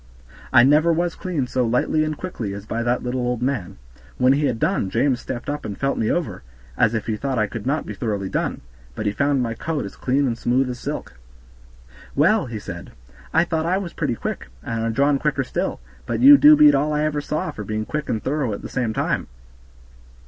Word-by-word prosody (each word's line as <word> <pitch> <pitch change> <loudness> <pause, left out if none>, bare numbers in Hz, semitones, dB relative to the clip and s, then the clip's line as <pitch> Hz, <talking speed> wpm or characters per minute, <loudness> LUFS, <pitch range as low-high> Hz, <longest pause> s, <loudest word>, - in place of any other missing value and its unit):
I 120 -2 +7
never 150 +5 +5
was 170 +1 0
cleaned 160 -9 -3
so 130 - +1
lightly 125 +6 +1
and 155 -1 -2
quickly 115 - -5
as 100 0 -8
by 115 +1 -3
that 120 +1 0
little 125 +1 -2
old 125 -1 -1
man. 125 -9 -2 0.4
When 130 +1 +4
he 145 +1 +1
had 125 -3 -1
done 155 - 0
James 125 +4 +1
stepped 120 -2 -6
up 145 0 -3
and 100 - -5
felt 135 0 0
me 110 - +1
over, 140 - -2 0.3
as 110 - +2
if 110 - -2
he 110 - -1
thought 135 +3 -2
I 110 - +3
could 115 +3 -6
not 150 +3 0
be - - -6
thoroughly 105 -6 -3
done, - - -2 0.3
but 110 - -4
he 105 - +2
found 140 +3 +1
my 115 -1 -2
coat 150 +2 -3
as 100 - -8
clean 135 +2 +1
and 120 -3 0
smooth 125 +2 +1
as 125 - -7
silk. 65 - -6 1.0
"Well," 185 +5 +3
he 115 -2 -5
said, 85 -4 -8 0.4
"I 165 - +4
thought 160 -1 -1
I 185 +2 +2
was 190 -3 -5
pretty 140 -6 -1
quick, - - -5 0.2
and 115 -1 -3
our 115 - 0
John 140 +4 +2
quicker 145 -2 0
still, - - -3 0.3
but - - -1
you 280 +3 +10
do 295 +2 +8
beat 300 0 +7
all 150 +2 +1
I 150 0 +1
ever 150 -1 0
saw 150 +2 -2
for 110 - -7
being 110 +1 -3
quick 150 +4 -4
and 110 - -1
thorough 135 -5 -1
at 100 - -7
the - - -6
same 120 -4 -1
time." - - -1
130 Hz, 230 wpm, -22 LUFS, 115-150 Hz, 1.0 s, you